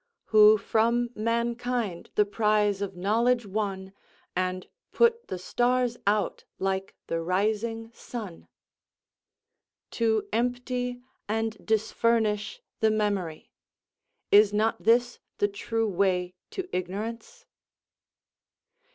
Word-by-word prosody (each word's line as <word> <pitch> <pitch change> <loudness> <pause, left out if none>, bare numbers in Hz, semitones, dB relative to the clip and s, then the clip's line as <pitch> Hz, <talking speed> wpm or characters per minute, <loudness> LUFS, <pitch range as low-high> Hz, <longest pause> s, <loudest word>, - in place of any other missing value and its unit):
"Who 215 0 +8
from 235 +3 +1
mankind 235 -3 -2
the 210 - +4
prize 210 -1 +1
of 195 -2 -3
knowledge 230 +6 +2
won, 195 -2 -3 0.4
And 185 0 -2 0.2
put 470 0 +3
the 185 - -4
stars 245 +5 +1
out 205 -2 +1
like 195 0 -2
the 165 0 -2
rising 220 +5 -1
sun." 215 -8 -8 1.4
To 220 -2 +1
empty 245 +1 -1 0.3
and 225 0 -1
disfurnish 220 - 0 0.2
the 220 - +4
memory, 205 -7 -2 0.8
is 205 0 +7
not 215 +2 +1
this 240 +2 +3 0.2
the 205 - +2
true 225 +3 -2
way 180 -2 0 0.2
to 380 -1 -5
ignorance? 225 - -5
215 Hz, 100 wpm, -27 LUFS, 200-235 Hz, 1.4 s, Who